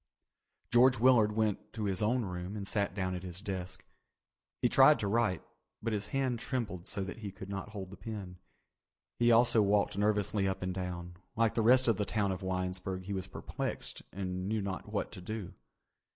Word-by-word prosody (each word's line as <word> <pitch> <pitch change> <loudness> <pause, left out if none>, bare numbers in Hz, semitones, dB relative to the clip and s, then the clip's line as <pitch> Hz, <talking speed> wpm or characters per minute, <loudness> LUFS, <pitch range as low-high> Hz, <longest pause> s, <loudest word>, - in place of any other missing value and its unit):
George 125 +1 +6
Willard 115 -3 +5
went 110 -2 -1
to 110 - -4
his 95 -2 0
own 115 +2 +2
room 90 +2 -5
and 100 -1 -4
sat 100 -3 0
down 95 -2 -1
at 90 - -4
his 90 -1 -6
desk. 95 -3 -5 0.8
He - - +6
tried - - +7
to - - -2
write 105 -4 +1 0.4
but 115 0 -2
his 105 -1 -1
hand 130 -1 0
trembled 110 -9 -3
so 100 -2 -1
that 95 +2 -6
he 105 -3 -5
could 95 0 -10
not 100 +1 -4
hold 95 -3 -7
the 100 - -10
pen. 95 -3 -7 0.8
He 120 0 +5
also 115 -1 +5
walked 100 -1 +2
nervously 105 -1 +2
up 95 0 -2
and 95 0 -2
down. 90 -1 -5 0.2
Like 115 -1 +2
the 115 - +1
rest 125 +3 +5
of 115 - +3
the 105 - 0
town 100 -2 0
of 95 0 -4
Winesburg 95 0 -3
he 100 +2 -4
was 95 -2 -3
perplexed - - -5
and 95 -1 -3
knew 110 0 0
not 95 -2 -4
what - - -2
to - - -9
do. 105 0 -5
100 Hz, 195 wpm, -32 LUFS, 95-110 Hz, 0.8 s, tried